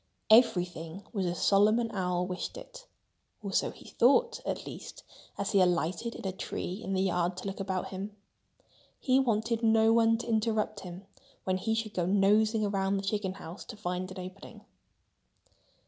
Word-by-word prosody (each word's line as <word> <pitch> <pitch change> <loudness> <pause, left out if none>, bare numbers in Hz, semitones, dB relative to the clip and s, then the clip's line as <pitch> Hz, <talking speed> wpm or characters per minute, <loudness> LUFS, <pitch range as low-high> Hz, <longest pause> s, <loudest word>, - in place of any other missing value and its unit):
Everything 180 -5 +3
was 195 -4 -1
as 175 -1 -2
Solomon 215 +4 +3
Owl 180 -3 -1
wished 180 - -5
it—or - - -12
so - - +2
he - - -13
thought, 465 - +3
at - - -3
least, - - -9 0.3
as 200 - -2
he 200 - +4
alighted 180 +6 0
in - - -8
a 190 - 0
tree 190 +1 -5
in 195 - -3
the 190 - +2
yard 180 -1 0
to 185 - -7
look 195 -1 -4
about 190 -1 -2
him. 200 +2 -6 0.8
He 260 0 +3
wanted 230 -2 0
no 225 0 +4
one 225 0 +4
to 235 - -7
interrupt 220 -2 0
him 180 +1 -9 0.4
when 185 0 0
he 220 +4 -1
should 220 -1 -3
go 175 -2 -1
nosing 210 +3 +3
around 195 -1 0
the 195 - -3
chicken 195 -1 -1
house, 185 -1 -9
to 225 - -9
find 185 -2 -3
an 185 - -9
opening. 185 +2 -12
200 Hz, 170 wpm, -30 LUFS, 185-225 Hz, 0.8 s, he